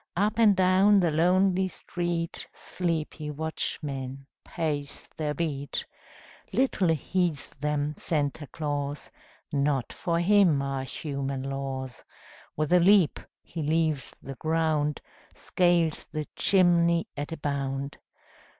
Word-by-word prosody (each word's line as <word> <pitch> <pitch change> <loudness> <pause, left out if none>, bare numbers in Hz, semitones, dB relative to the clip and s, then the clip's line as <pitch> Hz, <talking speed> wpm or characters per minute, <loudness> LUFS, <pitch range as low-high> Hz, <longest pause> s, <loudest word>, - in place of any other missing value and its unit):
Up 210 +4 +1
and 215 -3 +6
down 190 +2 +5
the 175 -3 +2
lonely 185 +4 +3
street 175 -2 -4
Sleepy 160 -3 -3
watchmen 140 -3 -4 0.2
pace 145 -4 -3
their 150 -1 -2
beat. 145 -4 -3 0.7
Little 220 -5 +2
heeds 165 0 0
them 150 0 -1
Santa 145 -1 -1
Claus; 145 -1 -4 0.4
Not 140 -3 0
for 170 -1 -1
him 180 -4 +4
are 135 -1 -2
human 140 -1 -4
laws. 135 -2 -4 0.5
With 155 +2 +1
a 180 - +7
leap 185 -2 +5 0.2
he 165 - -6
leaves 155 -2 0
the 135 - -6
ground, 155 -2 0 0.3
Scales 175 -3 +1
the 155 -1 -3
chimney 170 -3 +3
at 145 +2 -5
a 165 - -4
bound. 140 -1 -3
155 Hz, 115 wpm, -27 LUFS, 140-175 Hz, 0.7 s, a